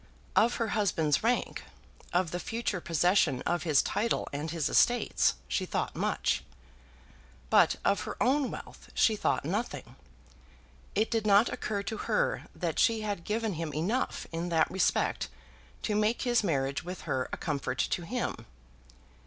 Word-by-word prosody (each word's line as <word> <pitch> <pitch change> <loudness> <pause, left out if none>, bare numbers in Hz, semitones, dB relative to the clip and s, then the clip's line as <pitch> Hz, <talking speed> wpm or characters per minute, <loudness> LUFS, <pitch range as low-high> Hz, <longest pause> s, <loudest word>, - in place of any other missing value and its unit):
Of 235 +3 +4
her 230 -2 -1
husband's 165 -9 +1
rank, 240 +2 0 0.5
of 175 -2 +1
the 175 - -2
future 225 -3 -2
possession 165 -5 +2
of 175 -1 0
his 155 -5 +3
title 230 +3 0
and 150 +3 -3
his 160 -2 -1
estates, 240 +5 +3
she - - 0
thought - - -2
much. 65 0 0 1.1
But - - +5
of 200 - +3
her 210 - -5
own 270 +1 +2
wealth - - -9
she 220 - +4
thought - - 0
nothing. - - -3 1.0
It 215 +2 +1
did 225 -2 0
not 205 +3 +6
occur 200 -2 -3
to 220 - -4
her - - 0
that - - -2
she 225 -2 +3
had 205 -5 -3
given 220 +1 -1
him 165 -2 -4
enough 210 +12 -1
in 170 +1 -3
that 165 -2 +2
respect 190 0 +1 0.5
to 215 - 0
make 215 +3 +1
his 240 -3 +2
marriage 140 -6 0
with 180 +2 -6
her 130 -1 -2
a - - -3
comfort 145 -3 -2
to - - 0
him. 245 +8 -3
200 Hz, 155 wpm, -30 LUFS, 165-225 Hz, 1.1 s, not